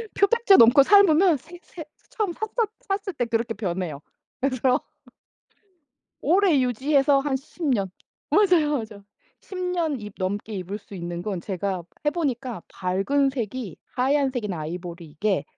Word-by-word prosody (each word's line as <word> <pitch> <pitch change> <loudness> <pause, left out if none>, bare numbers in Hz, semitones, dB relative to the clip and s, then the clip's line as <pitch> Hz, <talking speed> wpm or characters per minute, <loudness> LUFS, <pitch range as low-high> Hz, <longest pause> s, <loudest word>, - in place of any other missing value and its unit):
표백제 410 0 +5
넘고 240 +5 +8
삶으면 370 -1 +5
새 335 +5 -14
새 325 -3 -10 0.3
처음 420 -5 -2
샀었 435 0 -2
샀을 390 -5 -3
때 245 - +1
그렇게 230 -1 -1
변해요. 175 -7 -3 0.4
그래서 255 -1 +1 1.4
오래 360 +2 +4
유지해서 275 +3 +2
한 275 0 -1
10 305 +5 -9
년 200 -9 +1 0.4
맞아요. 360 -8 +4
맞아요. 215 -3 -8 0.4
10 380 - -10
년 345 -6 -1
입 210 -1 -9
넘게 205 +3 -3
입을 190 +2 -5
수 200 - -14
있는 175 -1 -5
건 190 -2 -3
제가 190 -1 -3 0.2
해 - - +5
보니까 260 - -3
밝은 195 +10 0
색이 230 - -4 0.2
하얀색이나 255 - 0
아이보리 170 +2 -6
이게 160 +1 -1
255 Hz, 275 characters per minute, -24 LUFS, 195-320 Hz, 1.4 s, 넘고